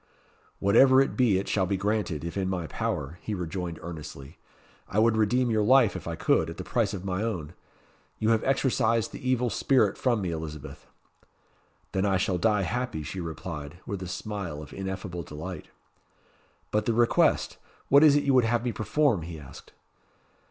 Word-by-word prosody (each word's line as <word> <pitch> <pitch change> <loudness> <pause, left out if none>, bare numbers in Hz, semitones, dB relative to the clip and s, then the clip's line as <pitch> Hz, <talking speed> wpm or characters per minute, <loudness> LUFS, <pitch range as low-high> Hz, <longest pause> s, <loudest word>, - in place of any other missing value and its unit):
"Whatever 130 +7 +5
it 135 - +2
be 120 -7 +3
it 95 - -3
shall 95 -3 +1
be 100 +1 0
granted, 100 -6 -1
if 85 - -5
in 95 -2 -1
my 90 -3 -2
power," 80 +1 -3
he 105 - -3
rejoined 90 -1 -4
earnestly. 75 -3 -9 0.5
"I 100 - -4
would 110 +1 +4
redeem 120 +3 +2
your 110 -1 +2
life, 120 0 +5
if - - -7
I - - -3
could, 80 - +2
at 80 - -8
the 95 - -5
price 105 +3 0
of 95 0 -7
my 95 0 -2
own. 90 -9 -3 0.6
You 110 +1 +1
have 110 -1 +2
exorcised 125 -4 +1
the - - -9
evil 125 -2 +1
spirit 125 -8 +2
from 120 -5 +1
me, 90 - -2
Elizabeth." 80 -2 -7 1.0
"Then 95 - 0
I 95 -1 +2
shall 90 0 0
die 105 +1 +2
happy," 120 -4 -3
she 95 +6 -6
replied, 80 -1 -6
with 100 -2 -5
a 90 - -5
smile 90 -5 -5
of 75 - -12
ineffable 95 -2 -5
delight. 80 +2 -7 1.0
"But 105 0 +1
the 115 - +2
request! 120 0 +2 0.3
What 140 +2 +7
is 150 -2 +7
it 145 - +2
you 140 - +2
would 130 -2 +5
have 120 +1 0
me 120 - 0
perform?" 115 - +1
he 80 0 -7
asked. 70 -3 -13
100 Hz, 185 wpm, -27 LUFS, 85-115 Hz, 1.0 s, What